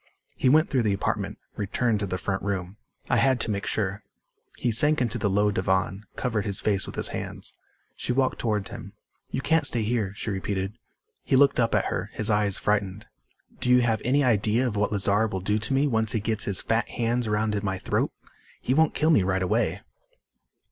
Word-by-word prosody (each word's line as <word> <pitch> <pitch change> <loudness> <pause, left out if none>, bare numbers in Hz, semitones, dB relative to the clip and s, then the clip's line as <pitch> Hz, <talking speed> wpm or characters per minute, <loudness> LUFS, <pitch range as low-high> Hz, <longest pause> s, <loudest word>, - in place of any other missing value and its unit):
He 130 - +2
went 155 +4 +4
through 130 -3 +2
the 105 -3 +1
apartment, 95 - -2 0.2
returned 105 +2 0
to 100 - -2
the 90 - -2
front 95 +1 -2
room. 95 -1 -3 0.3
"I - - +2
had 130 -2 +3
to 110 - 0
make 100 0 -3
sure." 100 -1 -1 0.6
He 120 - 0
sank 150 +7 +4
into 120 -1 0
the 100 - +1
low 105 +2 +2
divan, 95 +1 -1
covered 115 -5 -1
his 100 -2 -2
face 100 -2 +1
with - - -8
his - - 0
hands. - - -6 0.4
She - - -2
walked 130 +1 +1
toward 105 -4 -1
him. 100 - -9 0.4
"You 130 - -3
can't 160 +1 +2
stay 115 -5 0
here," 110 -3 -1
she 105 - -3
repeated. 95 0 -3 0.5
He - - +1
looked 140 0 +4
up 115 -1 +2
at - - +2
her, - - -3
his 110 0 -1
eyes 105 -2 +1
frightened. 105 -1 -1 0.5
"Do - - -1
you 125 0 +6
have 115 -3 +1
any 140 +4 +2
idea 115 0 +2
of 110 - -3
what 105 +1 0
Lazar 105 +2 +2
will 95 -3 -3
do 105 +3 0
to 105 +3 -2
me 135 +2 +3
once 110 -5 +1
he 115 - +1
gets 110 0 0
his 100 -2 +2
fat 115 +1 0
hands 120 0 -1
around 105 -1 0
my 95 -2 -2
throat? - - -1 0.5
He 130 - -1
won't 160 +2 +3
kill 155 +2 +3
me 145 - +5
right 95 0 0
away." 90 - 0
105 Hz, 210 wpm, -26 LUFS, 100-125 Hz, 0.6 s, you